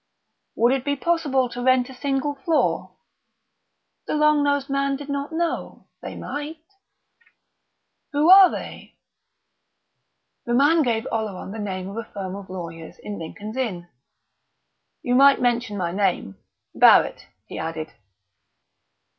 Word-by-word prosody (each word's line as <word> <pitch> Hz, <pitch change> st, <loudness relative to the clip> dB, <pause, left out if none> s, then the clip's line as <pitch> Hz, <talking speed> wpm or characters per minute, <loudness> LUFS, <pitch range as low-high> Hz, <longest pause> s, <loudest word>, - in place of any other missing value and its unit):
"Would 240 Hz, +3 st, +3 dB
it 270 Hz, -2 st, -1 dB
be 285 Hz, 0 st, 0 dB
possible 285 Hz, -5 st, +1 dB
to 245 Hz, +1 st, -6 dB
rent 255 Hz, 0 st, +3 dB
a 265 Hz, -, -11 dB
single 275 Hz, +2 st, -2 dB
floor?" 295 Hz, +4 st, -1 dB, 1.1 s
The -, -, -1 dB
long 300 Hz, 0 st, +4 dB
nosed 285 Hz, -1 st, 0 dB
man 275 Hz, 0 st, 0 dB
did 285 Hz, +1 st, -9 dB
not 280 Hz, +2 st, -3 dB
know; 335 Hz, +1 st, -3 dB, 0.2 s
they -, -, -7 dB
might.... 295 Hz, +2 st, -6 dB, 1.5 s
"Who 295 Hz, +1 st, +2 dB
are 380 Hz, -1 st, +9 dB
they?" -, -, -8 dB, 1.5 s
The 240 Hz, -, +1 dB
man 295 Hz, +5 st, +4 dB
gave 235 Hz, -4 st, 0 dB
Oleron 210 Hz, -4 st, -4 dB
the 220 Hz, -, -7 dB
name 190 Hz, -3 st, -4 dB
of 200 Hz, +3 st, -8 dB
a 230 Hz, -, -6 dB
firm 190 Hz, -1 st, -5 dB
of 200 Hz, -2 st, -10 dB
lawyers 165 Hz, -3 st, -8 dB
in 205 Hz, -1 st, -7 dB
Lincoln's 210 Hz, +8 st, -8 dB
Inn. 185 Hz, -9 st, -3 dB, 1.1 s
"You 245 Hz, -, 0 dB
might 275 Hz, +2 st, +6 dB
mention 240 Hz, -3 st, 0 dB
my 175 Hz, -3 st, -2 dB
name 185 Hz, -, -1 dB, 0.4 s
Barrett," -, -, +4 dB, 0.2 s
he -, -, -8 dB
added. 160 Hz, -1 st, -5 dB
250 Hz, 135 wpm, -23 LUFS, 200-285 Hz, 1.5 s, are